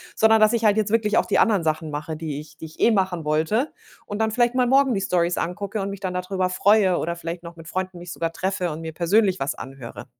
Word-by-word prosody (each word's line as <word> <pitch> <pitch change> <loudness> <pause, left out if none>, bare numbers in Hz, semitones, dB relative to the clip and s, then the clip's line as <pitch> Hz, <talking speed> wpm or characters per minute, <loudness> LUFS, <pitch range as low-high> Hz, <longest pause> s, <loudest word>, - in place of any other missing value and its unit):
Sondern 220 0 +5
dass 215 +2 +5
ich 230 -1 0
halt 210 0 +4
jetzt 215 -1 0
wirklich 220 -2 +2
auch - - +3
die - - +2
anderen 205 -7 +3
Sachen 155 0 -1
mache, 150 +2 -4
die 155 -2 -5
ich 150 0 -13
die 160 - -8
ich 155 - -13
eh 235 - +4
machen 185 -5 0
wollte 160 - 0 0.4
und 205 +1 -5
dann 220 0 +2
vielleicht 240 +1 +2
mal 250 -1 +3
morgen 270 -1 +4
die 195 - -1
Storys 175 -2 0
angucke 200 +4 -3
und 195 - -3
mich 200 - -7
dann 185 -2 -3
darüber 185 0 -1
freue 190 0 +3
oder 170 +1 -2
vielleicht 170 +1 -6
noch 170 0 -9
mit 165 -1 -13
Freunden 185 +1 -4
mich 175 0 -9
sogar 165 0 -3
treffe 185 -2 -2
und 155 +2 -6
mir 160 -1 -6
persönlich 190 +3 +2
was 135 +3 -1
anhöre. 135 -2 -9
185 Hz, 260 wpm, -23 LUFS, 165-215 Hz, 0.4 s, Sondern